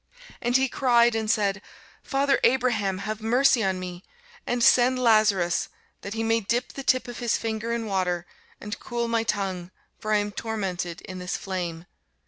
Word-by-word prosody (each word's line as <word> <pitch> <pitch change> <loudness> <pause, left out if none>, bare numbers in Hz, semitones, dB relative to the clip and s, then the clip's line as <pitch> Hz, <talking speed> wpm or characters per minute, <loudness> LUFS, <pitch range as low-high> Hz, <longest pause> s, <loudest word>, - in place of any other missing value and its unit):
And 240 +2 +3
he 265 0 +2
cried 240 -2 +3
and 220 -1 -2
said, 200 -3 +1 0.4
Father 275 0 +1
Abraham, 235 -7 +2
have 215 0 -4
mercy 245 +1 +3
on 190 -1 0
me, 180 0 -7 0.4
and 245 -1 0
send 255 +2 +5
Lazarus, 215 -7 +3 0.3
that 200 +2 -6
he 225 - -1
may 225 0 +2
dip 235 +4 -2
the 275 - -6
tip 255 -1 +1
of 240 - -7
his 240 -2 +1
finger 225 0 -3
in 235 -1 -2
water, 180 -4 -1 0.3
and 210 +2 -6
cool 235 -1 -3
my 230 -1 +1
tongue; 190 -5 -2 0.3
for 215 - -4
I 210 - +5
am 205 0 -1
tormented 190 -6 -4
in 185 0 -8
this 180 0 -3
flame. 175 -4 -4
220 Hz, 175 wpm, -25 LUFS, 190-240 Hz, 0.4 s, send